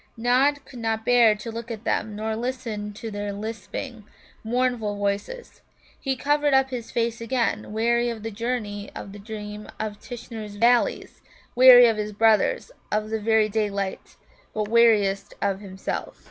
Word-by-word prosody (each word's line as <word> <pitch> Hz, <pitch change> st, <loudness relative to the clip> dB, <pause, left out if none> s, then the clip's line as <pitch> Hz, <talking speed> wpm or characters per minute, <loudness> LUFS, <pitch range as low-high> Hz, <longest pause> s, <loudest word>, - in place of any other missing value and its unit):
Nod 265 Hz, +4 st, +2 dB
could 245 Hz, -, -11 dB
not 225 Hz, -1 st, -2 dB
bear 235 Hz, -3 st, +5 dB
to 215 Hz, +2 st, -7 dB
look 230 Hz, +1 st, -7 dB
at 225 Hz, -2 st, -6 dB
them 215 Hz, -2 st, -1 dB
nor 220 Hz, +1 st, -2 dB
listen 230 Hz, -3 st, -4 dB
to 220 Hz, +2 st, -7 dB
their 205 Hz, 0 st, -4 dB
lisping, 220 Hz, +3 st, -6 dB, 0.4 s
mournful 235 Hz, -2 st, 0 dB
voices. 205 Hz, -, -4 dB, 0.4 s
He 270 Hz, -1 st, -1 dB
covered 290 Hz, +1 st, +2 dB
up 265 Hz, 0 st, +3 dB
his 240 Hz, -3 st, -5 dB
face 235 Hz, -1 st, -1 dB
again, 230 Hz, -3 st, -1 dB
weary 235 Hz, +2 st, +1 dB
of 225 Hz, -2 st, -6 dB
the 225 Hz, -, -4 dB
journey 210 Hz, -2 st, -3 dB
and -, -, -11 dB
of 195 Hz, -, -11 dB
the 205 Hz, -, -10 dB
dream 210 Hz, 0 st, -7 dB
of 210 Hz, -1 st, -4 dB
Tishnar's 220 Hz, -4 st, -8 dB
Valleys, 235 Hz, +3 st, +2 dB, 0.3 s
weary 250 Hz, -1 st, +9 dB
of 225 Hz, -2 st, +1 dB
his 210 Hz, 0 st, -3 dB
brothers, 225 Hz, -, +2 dB, 0.2 s
of 215 Hz, +1 st, -1 dB
the 220 Hz, -, -1 dB
very 220 Hz, 0 st, +3 dB
daylight, 200 Hz, -2 st, -3 dB, 0.4 s
but 215 Hz, -1 st, -1 dB
weariest 205 Hz, -4 st, +3 dB
of 195 Hz, -1 st, 0 dB
himself. 190 Hz, -2 st, -5 dB
225 Hz, 160 wpm, -24 LUFS, 210-240 Hz, 0.4 s, weary